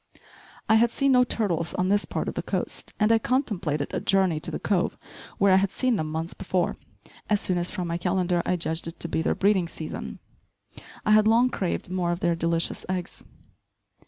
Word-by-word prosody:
I 220 - +5
had 235 +1 +4
seen 275 +3 +1
no 250 -1 +6
turtles 180 -9 0
on 185 0 0
this 205 +1 +2
part - - -3
of - - -2
the - - -3
coast, - - -3
and 210 +1 +3
I 225 - +5
contemplated 190 - -1
a - - 0
journey 190 -5 +2
to - - -6
the - - -3
cove 190 -4 0 0.4
where 200 -1 +4
I - - +7
had 195 0 +1
seen 255 -2 +1
them 155 -6 -2
months 160 +2 -3
before, 185 -2 -1 0.5
as 210 -1 +3
soon 180 -2 0
as, 175 +1 +1
from 180 -4 -3
my 170 0 -2
calendar, 180 -1 +1
I 180 - 0
judged 165 -1 -3
it 165 - -8
to - - -3
be 160 - -1
their - - 0
breeding 195 -3 +2
season. 160 -1 -6 0.9
I 215 - +3
had 215 0 +6
long 235 +3 +4
craved 180 -2 -3
more 180 -2 0
of 175 - -2
their 170 0 +2
delicious 165 0 -1
eggs. 185 -1 -4
185 Hz, 210 wpm, -26 LUFS, 170-210 Hz, 0.9 s, I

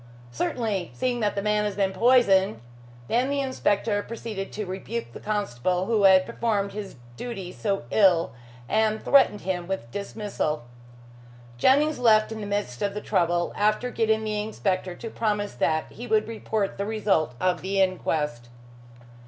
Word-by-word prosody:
"Certainly, 200 - -2
seeing 250 -1 -1
the 205 -2 0
man 210 0 +2
has 205 -2 -2
been 195 -1 0
poisoned." 195 - +4 0.5
Then 245 - +1
the 280 0 0
inspector 205 -5 0
proceeded 215 -3 -6
to 210 - -4
rebuke 190 - -5
the - - -8
constable 185 - -1
who 215 -2 +2
had 190 -1 +7
performed 205 -4 -1
his 200 -4 -7 0.2
duty 195 -7 -6
so 200 -1 -2
ill, 185 -5 +4 0.4
and 220 +4 +1
threatened 270 -7 +5
him 180 -1 -3
with 185 -12 -4
dismissal. 200 - -3 0.9
Jennings 295 - +3
left 220 -3 +4
in 220 -1 -5
the 205 - -5
midst 200 -12 -3
of 200 0 -1
the - - -2
trouble, 175 -2 +1
after 215 +4 +1
getting 220 -1 +1
the 215 -1 -1
inspector 190 -4 -2
to 230 - -7
promise 210 -2 -1
that 155 +5 0
he 240 - -8
would 215 -1 +2
report 220 -3 -3
the 200 - -1
result 200 - 0
of 180 -1 +1
the 195 +1 -1
inquest. 150 -10 0
205 Hz, 155 wpm, -25 LUFS, 185-220 Hz, 0.9 s, had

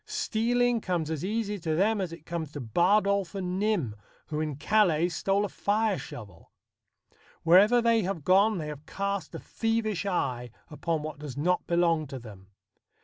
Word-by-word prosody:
Stealing 245 - +1
comes 170 -5 -2
as 155 -1 -3
easy 210 0 -2
to 160 -2 -1
them 205 +4 +2
as 180 -3 -3
it 165 -2 -11
came 170 -2 -4
to 145 +1 -8
Bardolph 195 - +2
and 185 -1 -2
Nym, 195 - 0 0.3
who 150 -1 -2
in 155 -2 -2
Calais 175 0 +2
stole 195 +4 0
a - - -2
fire 210 +1 0
shovel. 105 - -11 0.9
Wherever 205 +8 +6
they 230 -1 +4
have 185 -5 -3
gone 195 +5 +4
they 155 -3 -4
have 150 0 -9
cast 200 -1 -3
a - - -5
thievish 220 -4 -1
eye 125 -10 -1 0.2
upon 155 +1 -2
what 155 -1 -6
does 145 -3 -7
not 180 +5 0
belong 170 -3 +2
to 135 - -7
them. 105 -6 -12
180 Hz, 170 wpm, -28 LUFS, 155-210 Hz, 0.9 s, Wherever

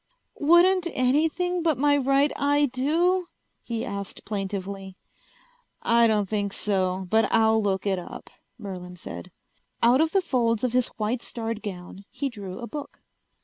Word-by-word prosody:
"Wouldn't 345 +4 +5
anything 320 +7 +1
but 320 -5 +1
my 290 +2 +3
right 275 +1 +3
eye 290 +1 +2
do?" 340 +7 +1 0.3
he 230 -1 -4
asked 200 -1 -6
plaintively. 195 -1 -5 0.9
"I 235 0 +5
don't 210 -3 +1
think 205 -1 -2
so, 190 -2 0
but 220 0 +3
I'll 220 0 +4
look 195 -2 -1
it 195 -2 +1
up," 175 - -10 0.3
Merlin 185 -5 -7
said. 85 - -8 0.5
Out 245 +5 +5
of 320 - +3
the 390 - +3
folds 235 -7 +1
of 250 -2 0
his 250 -1 +3
white 225 +3 -1
starred 225 -2 -5
gown 190 0 -8
he 275 +2 -3
drew 200 -6 -8
a 240 - -6
book. 290 +3 -8
230 Hz, 150 wpm, -25 LUFS, 200-285 Hz, 0.9 s, Wouldn't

